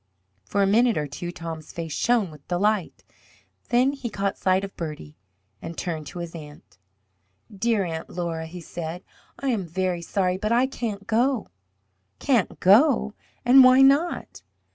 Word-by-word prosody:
For 200 - +1
a - - +4
minute 230 +4 +3
or 150 - -1
two 160 +6 -6
Tom's 165 -2 -8
face 165 -3 -5
shone 225 -5 +1
with 150 -2 -16
delight. 195 +1 0 0.7
Then 250 +3 +3
he 270 -4 -5
caught 200 -2 -2
sight 185 +1 +1
of 195 - -7
Bertie 150 - -7 0.5
and 165 0 -7
turned 160 -4 -4
to - - -9
his 170 -1 -6
aunt. 150 - -12 0.8
"Dear 220 0 +1
Aunt 160 -1 -5
Laura," 165 -2 -4
he 175 +2 -9
said, 170 +1 -6 0.3
"I 275 - -2
am 205 -8 -1
very 180 0 -2
sorry, 185 +1 0
but 215 +3 -2
I 240 +2 +4
can't 220 -6 -5
go." 240 +2 +1 0.7
"Can't 240 -8 0
go? 215 +2 +4 0.3
and 260 +2 +8
why 255 +1 +7
not?" 285 +6 +2
190 Hz, 160 wpm, -24 LUFS, 165-235 Hz, 0.8 s, and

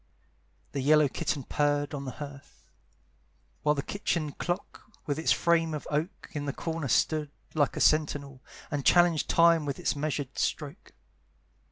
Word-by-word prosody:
The 140 - -2
yellow 150 +2 +5
kitten 140 +1 -2
purred 145 0 0
on 140 -1 -4
the 130 - -5
hearth, 145 -1 -10 1.0
While 150 0 +2
the 140 - -2
kitchen 170 -6 -2
clock, 175 +6 -5
with 145 0 -2
its 160 - +2
frame 165 -2 +2
of 150 - -6
oak, 155 +6 -2
In 150 -2 -4
the 140 - -2
corner 165 -3 -3
stood, 150 +4 +1 0.2
like 145 -3 +1
a - - -1
sentinel, 145 -3 +1 0.3
And 145 -2 -2
challenged 175 -1 +4
time 170 -1 +5
with 140 -2 -3
its - - -1
measured 145 -2 -3
stroke. - - -3
150 Hz, 155 wpm, -29 LUFS, 140-160 Hz, 1.0 s, yellow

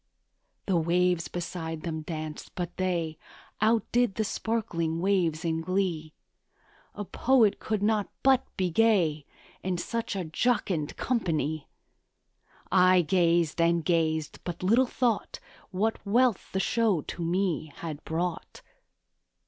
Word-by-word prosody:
The 190 -3 +2
waves 175 +1 +2
beside 165 -2 -5
them 160 -2 -3
danced; 155 -1 -6
but 175 -1 -4
they 170 -4 -1 0.4
Outdid 225 0 +2
the 220 - 0
sparkling 195 -8 -2
waves 175 -3 +1
in 165 0 0
glee; 170 -3 -1 0.8
A 205 - -5
poet 230 -2 +3
could 215 -2 -2
not 210 -1 +1
but 265 -1 +5
be 185 -2 0
gay 170 -8 +2 0.3
In 185 -1 -1
such 230 +4 -3
a 190 - -2
jocund 165 -3 0
company; 155 - -1 1.0
I 185 -1 +5
gazed 170 -1 +2
and 170 -1 +2
gazed 160 -2 0
but 175 0 -5
little 235 +7 +4
thought 240 -3 -1 0.3
What 210 +4 -1
wealth 235 +1 +2
the 190 - -1
show 210 -3 +2
to 170 - -6
me 170 -3 -1
had 155 -3 -6
brought. 170 +1 -4
180 Hz, 125 wpm, -28 LUFS, 165-210 Hz, 1.0 s, but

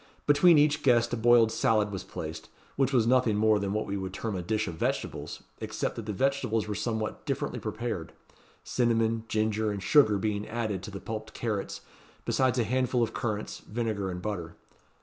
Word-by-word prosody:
Between 150 +3 +6
each 150 +1 +3
guest 120 -3 +3
a - - +3
boiled 115 -1 +5
salad 110 -4 +2
was 95 - -5
placed, 80 +1 -7 0.3
which 135 -1 +2
was 120 -5 +3
nothing 125 -3 +3
more 110 0 +4
than 100 -1 -2
what 110 +1 -1
we 100 - -4
should 95 -1 -4
term 110 0 -3
a 90 - -2
dish 110 +4 -1
of 85 - -4
vegetables, 80 - -3 0.2
except - - -3
that 115 -2 -7
the - - -1
vegetables 125 -2 0
were 105 - -2
somewhat 110 +1 -3
differently - - -2
prepared; 110 -8 -4 0.5
cinnamon, 115 -2 +1
ginger, 110 0 0
and 100 -1 -4
sugar 135 -9 +5
being 105 +1 -2
added 110 -4 -2
to 95 - -7
the 100 -1 -7
pulped 110 +1 -6
carrots, 105 -4 -3 0.4
besides 130 -1 +2
a 120 - +3
handful 125 +1 +1
of 115 - -2
currants, 105 -2 -3
vinegar, 110 -3 -3
and 90 -1 -5
butter. 85 -6 -4
110 Hz, 190 wpm, -28 LUFS, 105-120 Hz, 0.5 s, Between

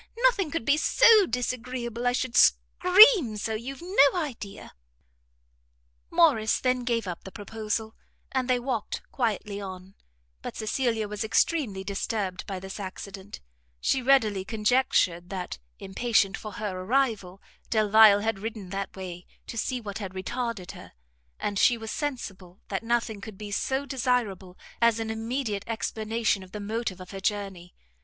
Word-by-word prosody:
Nothing 410 -9 +3
could 290 -6 -3
be 285 +3 +4
so 435 +3 +6
disagreeable 245 -1 -3
I - - +4
should 250 -1 -2
scream 360 - +6
so, 220 +2 -2
you've 260 +8 -6
no 355 -3 +4
idea." 225 - -6 1.4
Morrice 295 -11 +3
then 255 -1 0
gave 230 -3 0
up 180 -2 -6
the 190 - -9
proposal, 220 +1 -4 0.4
and 260 -1 -1
they 250 -1 +3
walked 240 -4 -3
quietly 210 -4 -2
on; 190 -1 -8 0.5
but - - -6
Cecilia 220 -1 -1
was 210 0 -4
extremely 220 - +1
disturbed 195 -1 -3
by 195 -2 -4
this 190 +2 -8
accident; 195 0 -8 0.4
she 265 - +1
readily 225 -7 +3
conjectured 210 -5 +1
that, 180 - -5 0.2
impatient 200 0 +1
for 215 -2 -8
her 205 -5 -4
arrival, 205 -4 0 0.3
Delvile 215 -1 +6
had 220 -2 -1
ridden 215 -3 -6
that 195 0 -4
way, 180 -2 -8 0.2
to - - -8
see 250 +3 -2
what 205 -2 -6
had 190 -3 -6
retarded 230 -1 -4
her, - - -13 0.5
and 200 -1 -2
she 240 - +5
was 225 -1 -6
sensible 200 - -5
that 195 - -2
nothing 230 -2 -1
could 210 -1 -9
be 210 0 -7
so 265 +6 -1
desirable 235 -9 -1 0.2
as 235 -1 +4
an 220 0 -2
immediate 225 -2 -3
explanation 220 -2 -1
of 185 -1 -13
the 210 - -5
motive 210 -2 -3
of 185 - -10
her 195 - -6
journey. 195 -3 -3
220 Hz, 150 wpm, -27 LUFS, 195-250 Hz, 1.4 s, so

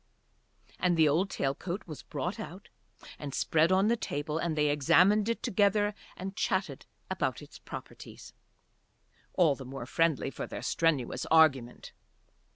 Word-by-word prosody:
And 175 -2 +2
the 160 -1 +5
old 170 +7 +2
tail 135 -6 -1
coat 180 +7 -5
was 155 -4 -8
brought - - -4
out - - -9 0.5
and 140 -2 -6
spread 160 +2 +2
on 190 +2 +4
the 235 - +3
table, 150 -6 -3
and 165 -2 -2
they 150 -1 +3
examined 195 +9 +4
it 230 - -2
together 205 -2 +2 0.2
and 190 +1 -6
chatted 190 0 -2 0.2
about - - -1
its - - -13
properties, - - -10 1.0
all 170 -6 +4
the 135 - -9
more 130 -1 -7
friendly 160 0 +1
for - - -6
their - - -7
strenuous 160 -7 0
argument. 140 -7 +3
165 Hz, 150 wpm, -30 LUFS, 145-195 Hz, 1.0 s, the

